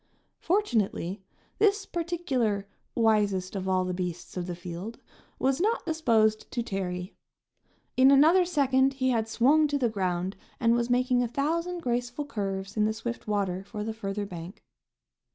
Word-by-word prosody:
Fortunately, 215 - 0 0.4
this 410 -1 +3
particular 285 - -1 0.3
"wisest 205 -5 +2
of 190 -1 -2
all 185 -1 +2
the 180 - -2
beasts 180 -1 -5
of 180 -1 -3
the 175 - -4
field," 180 +6 -7 0.4
was 270 +4 +1
not 440 +4 +1
disposed 230 -10 +2
to 240 - -2
tarry. 185 -3 -4 0.8
In 260 +1 +6
another 315 +7 +6
second 275 -5 +2
he 260 -1 +1
had 225 -2 0
swung 285 +7 +4
to 290 0 0
the 250 -4 +1
ground 185 -2 -2 0.2
and 230 -1 +3
was 235 0 +1
making 250 0 +2
a 245 - +1
thousand 335 +8 -1
graceful 245 +3 -2
curves 195 -6 -4
in 210 -1 +2
the 220 - +1
swift 235 +1 -5
water 195 -3 -1
for 210 +1 -6
the 220 +1 -3
further 205 -1 -4
bank. 175 0 -9
225 Hz, 155 wpm, -28 LUFS, 195-275 Hz, 0.8 s, In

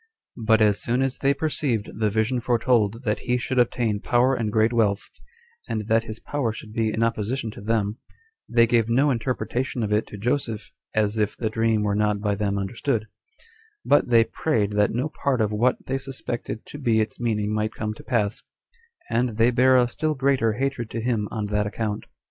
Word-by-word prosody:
But 110 -1 +5
as 105 -1 +3
soon 125 +3 +1
as 135 -1 -2
they 140 - +3
perceived 140 -6 -1
the 110 -1 +2
vision 110 +4 0
foretold 120 -2 +1
that 105 -3 0
he 125 0 0
should 125 +1 -1
obtain 120 -3 +1
power 125 +4 +2
and 115 -4 -1
great 110 +2 +2
wealth, 105 -3 +1 0.6
and 105 -1 -2
that 115 +1 +3
his 110 0 -7
power 140 -6 -2
should 110 0 -10
be 110 -1 0
in 110 +2 0
opposition 115 +1 -1
to 105 - -11
them, 110 0 -1 0.5
they 115 0 +5
gave 115 -1 +2
no 135 +5 +3
interpretation 125 0 -2
of 105 -1 -1
it 105 - +1
to 105 - -9
Joseph, 115 -1 -2 0.2
as 110 0 +1
if 105 -1 0
the 110 -2 -2
dream 115 -1 +1
were 105 -1 +1
not 105 0 +1
by 105 0 0
them 100 0 -1
understood: 110 +4 -1 0.8
but 145 - +3
they 115 -1 +6
prayed 115 -5 -1
that 105 0 +2
no 125 +6 -1
part 140 -4 -1
of 110 -1 +1
what 120 +4 +1
they 135 - -1
suspected 120 -4 -5
to 145 - -9
be 115 -5 +2
its 110 - -2
meaning 105 -3 0
might 110 0 -1
come 110 0 -3
to - - -13
pass; 110 -5 0 0.7
and 120 -1 0
they 115 +2 +4
bare 130 +2 +5
a 125 -1 +4
still 155 +5 -2
greater 130 -5 +2
hatred 130 -2 -2
to 115 - -4
him 115 -3 0
on 110 -3 -3
that 105 0 0
account. 105 -1 -3
115 Hz, 200 wpm, -24 LUFS, 105-125 Hz, 0.8 s, they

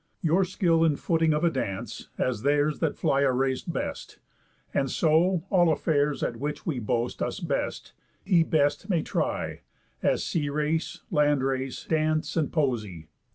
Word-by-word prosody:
Your 170 +4 +3
skill 170 -3 +2
in 160 -3 +3
footing 165 +1 +1
of 150 +2 0
a 170 - +4
dance, 100 -9 -4
as 125 -4 -1
theirs 145 +2 +2
That 160 -3 -1
fly 135 - +2
a 140 -2 +3
race 130 0 0
best. - - -5 0.6
And 135 -1 +1
so, 165 +4 +2
all 175 -4 +5
affairs, 150 -2 +1
At 115 - -2
which 145 +4 -4
we 150 -7 -1
boast 120 +1 -2
us - - -2
best, - - -3 0.3
he 180 -4 +4
best 145 +1 +1
may 170 -5 +1
try, - - -2 0.4
As - - +1
sea 145 -3 -1
race, 150 +2 -1
land 145 -3 +3
race, 135 -1 -2
dance, 155 -1 0
and 160 -4 0
poesy. 110 - -2
150 Hz, 160 wpm, -27 LUFS, 135-165 Hz, 0.6 s, all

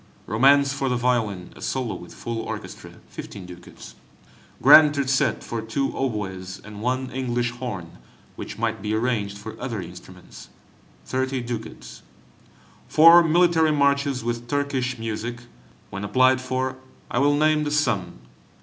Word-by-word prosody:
Romance 140 +6 +4
for 135 -1 -2
the 125 - 0
violin 115 -7 -1
(a - - -14
solo 125 -5 -2
with 90 -1 -10
full 115 -1 -5
orchestra), - - -7 0.2
15 100 -3 -9
ducats. 90 -1 -12 0.7
Grand 150 -1 +8
Terzet 135 -2 0
for 115 -1 -4
two 115 +5 -2
oboes, 95 -7 -4
and 105 -1 -10
one 130 +2 -2
English 120 -2 -1
horn 105 - -7 0.4
(which - - -7
might 110 -2 -2
be 105 +1 -1
arranged 110 -4 -1
for 105 +2 -8
other 120 -4 -3
instruments), 90 0 -11 0.6
30 130 0 -2
ducats. 120 -1 -7 0.9
Four 165 +2 +8
military 165 -1 +3
Marches 140 -2 +1
with 120 0 -3
Turkish 135 -2 -1
music; 115 +1 -5 0.5
when 100 - -5
applied 130 +5 +3
for, 130 0 -2 0.3
I 120 - +1
will 145 +1 +3
name 155 0 +3
the 150 - -2
sum. 100 - -1
125 Hz, 140 wpm, -23 LUFS, 105-135 Hz, 0.9 s, Grand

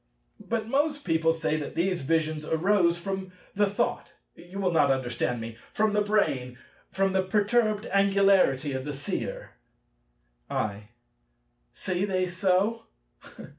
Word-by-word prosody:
But 225 -1 -2
most 290 +4 0
people 165 -2 +2
say 160 -1 -1
that 150 - -6
these 180 +1 0
visions 155 +1 0
arose 170 +2 +2
from 190 +1 -4 0.2
the 205 0 +2
thought—you 175 -1 -5
will 190 -2 +1
not 150 -4 +3
understand 125 -2 -1
me—from 115 - -2
the 210 - +2
brain; 135 -13 0 0.3
from 195 0 0
the 190 - +3
perturbed 210 +2 +1
angularity 195 -8 +3
of 130 0 -3
the 145 +1 -4
Seer. 140 +1 -5 1.0
I. 105 0 -3 0.8
Say 185 +1 -2
they 185 -2 0
so? 190 +5 +1
185 Hz, 125 wpm, -27 LUFS, 155-200 Hz, 1.0 s, not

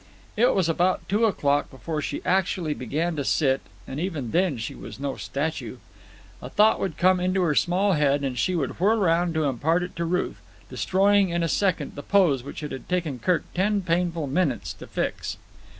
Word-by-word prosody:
It 240 +4 +3
was 185 -4 +2
about 175 +3 +1
two 210 +4 +2
o'clock 145 -9 +1
before 150 +3 -4
she - - -4
actually 180 -4 +1
began 155 +7 -2
to 140 - -1
sit, 135 -1 +2 0.3
and 135 - -5
even 155 - -3
then 175 -6 +1
she 110 - -5
was - - -10
no 140 -1 -3
statue. 155 +3 -4 0.6
A - - -7
thought 215 +1 +4
would 175 -6 -3
come 185 0 +4
into 185 +1 +1
her 160 -4 +2
small 185 +6 +2
head 145 -2 +2
and 135 -2 -2
she 180 +9 0
would 145 -4 -2
whirl 210 +5 +3
round 170 -3 +2
to 160 - +1
impart 150 +6 +1
it 180 - -7
to 170 - -1
Ruth, 180 +2 -2 0.3
destroying 195 0 +3
in 170 0 0
a - - +1
second 180 -4 0
the 145 - -7
pose 170 -8 +3
which 140 +4 -8
it 150 - -5
had 130 - -8
taken 165 -8 -1
Kirk 180 +8 +1
ten 200 +3 +1
painful 170 -2 0
minutes 140 -2 -1
to - - -12
fix. - - -3
170 Hz, 200 wpm, -25 LUFS, 145-185 Hz, 0.6 s, thought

